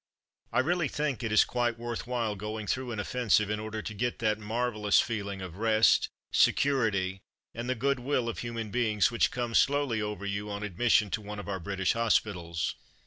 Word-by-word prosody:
I - - +3
really 170 +3 +1
think 145 -3 -2
it 115 -2 -2
is 110 - +6
quite 120 -1 -1
worth 120 0 -5
while 120 -4 -1
going 105 +2 -5
through 125 +4 -2
an 110 - -4
offensive 105 -2 +1
in 105 - -1
order 110 0 -5
to 110 - -5
get 120 +4 -2
that 110 -1 0
marvellous 110 -1 +1
feeling 100 -4 -2
of 90 -1 -8
rest, 110 0 +4 0.2
security, 100 -9 +2 0.3
and 120 +2 -5
the 130 - +1
goodwill 130 0 0
of 115 - -3
human 115 -3 -4
beings 110 -4 +2
which 120 - +2
comes 120 -2 +1
slowly 140 -6 +1
over 105 -1 -4
you 100 +1 -3
on 100 0 -4
admission 105 +1 +2
to 110 - -1
one 105 0 -7
of 105 - -7
our 95 -2 -3
British 95 +2 0
hospitals. 90 -7 0
110 Hz, 190 wpm, -29 LUFS, 105-120 Hz, 0.3 s, is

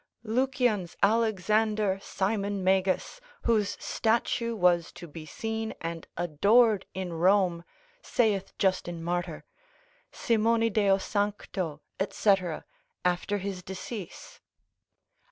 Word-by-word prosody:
Lucian's 240 -5 0
Alexander 215 -1 +2
Simon 200 0 -1
Magus, 190 - +1 0.2
whose 215 -4 +1
statue 230 +1 0
was 175 -3 +3
to 175 - -10
be 155 0 -10
seen 220 +4 -4
and 165 0 -5
adored 200 +6 +3
in 185 -2 -4
Rome, 180 0 +3 0.4
saith 210 - 0
Justin 175 -3 0
Martyr, 175 -1 -2 0.7
Simoni 230 0 +2
deo 200 -2 +4
sancto, 195 -6 -2 0.3
&c., 205 - +4 0.7
after 180 +3 +1
his 195 -1 -4
decease. 195 - -8
200 Hz, 95 wpm, -28 LUFS, 180-220 Hz, 0.7 s, deo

